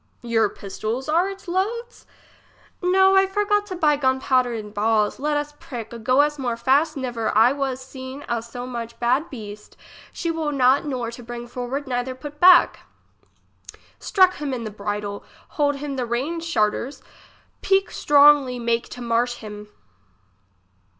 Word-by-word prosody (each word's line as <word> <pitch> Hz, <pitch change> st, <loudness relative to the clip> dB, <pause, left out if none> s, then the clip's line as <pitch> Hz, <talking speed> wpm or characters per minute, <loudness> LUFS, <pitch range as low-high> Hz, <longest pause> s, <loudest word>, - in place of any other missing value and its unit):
Your 225 Hz, -3 st, +2 dB
pistols 215 Hz, +8 st, -5 dB
are 340 Hz, +5 st, +2 dB
its 390 Hz, -1 st, -10 dB
loads? 450 Hz, +7 st, -3 dB, 0.7 s
No; 380 Hz, +1 st, +4 dB
I 385 Hz, 0 st, +5 dB
forgot 415 Hz, +1 st, 0 dB
to 375 Hz, -, -5 dB
buy 300 Hz, -4 st, +2 dB
gun 260 Hz, -2 st, +1 dB
powder 255 Hz, -2 st, +2 dB
and 215 Hz, -3 st, -6 dB
balls. 215 Hz, 0 st, +1 dB
Let 295 Hz, +1 st, 0 dB
us 295 Hz, 0 st, -4 dB
prick. 235 Hz, -3 st, -8 dB
Go 255 Hz, +5 st, +4 dB
us 295 Hz, 0 st, 0 dB
more 240 Hz, -3 st, -2 dB
fast 275 Hz, +6 st, +2 dB
never 240 Hz, -4 st, -2 dB
I 230 Hz, +3 st, +6 dB
was 270 Hz, -2 st, -2 dB
seen 260 Hz, +2 st, -9 dB
a 235 Hz, -1 st, -1 dB
so 240 Hz, +2 st, -8 dB
much 235 Hz, -2 st, -7 dB
bad 255 Hz, +7 st, +1 dB
beast; 210 Hz, -4 st, -10 dB, 0.3 s
she 335 Hz, -, -3 dB
will 320 Hz, -2 st, -2 dB
not 265 Hz, 0 st, +3 dB
nor 245 Hz, -4 st, -3 dB
to 235 Hz, -, -10 dB
bring 240 Hz, 0 st, -7 dB
forward 250 Hz, +4 st, -5 dB
neither 250 Hz, 0 st, -2 dB
put 295 Hz, +3 st, -10 dB
back. 360 Hz, 0 st, +6 dB, 1.2 s
Strek 375 Hz, -3 st, +3 dB
him 270 Hz, -5 st, -4 dB
the 215 Hz, -, -5 dB
bridle, 205 Hz, 0 st, -4 dB, 0.3 s
hold 290 Hz, -1 st, 0 dB
him 280 Hz, -1 st, -5 dB
the 250 Hz, -, -1 dB
reins 310 Hz, +8 st, -2 dB
shart 215 Hz, -10 st, +2 dB
ers. 270 Hz, +4 st, -7 dB, 0.6 s
Pique 390 Hz, 0 st, +2 dB
stron 290 Hz, 0 st, +6 dB
gly, 250 Hz, -1 st, -5 dB
make 235 Hz, 0 st, -1 dB
to 250 Hz, -, -9 dB
marsh 240 Hz, +1 st, 0 dB
him. 210 Hz, -1 st, -9 dB
260 Hz, 165 wpm, -23 LUFS, 235-295 Hz, 1.2 s, I